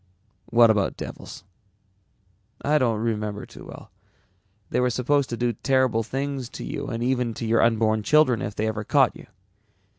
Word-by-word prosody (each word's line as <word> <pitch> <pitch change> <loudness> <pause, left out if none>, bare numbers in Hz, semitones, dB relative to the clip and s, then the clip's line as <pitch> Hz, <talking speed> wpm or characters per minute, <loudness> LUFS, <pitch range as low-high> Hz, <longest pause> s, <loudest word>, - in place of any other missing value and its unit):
"What 115 -1 +5
about 105 -3 0
devils?" - - -8 1.2
"I 150 +1 +3
don't 115 -4 +1
remember 105 -2 -3
too - - -13
well, - - -12
but 95 +1 -40
they - - +1
were 125 0 +2
supposed 130 +3 +1
to 120 - -4
do 120 0 0
terrible 130 -1 +1
things 135 +2 -4
to - - -7
you 140 0 -5
and 115 0 -3
even 125 -2 0
to 115 - -5
your 115 +1 +3
unborn 110 -1 +2
children 130 -1 +3
if 105 - -4
they 110 - -1
ever 110 -1 -2
caught 135 +2 +3
you. - - -13
115 Hz, 175 wpm, -24 LUFS, 110-130 Hz, 1.2 s, What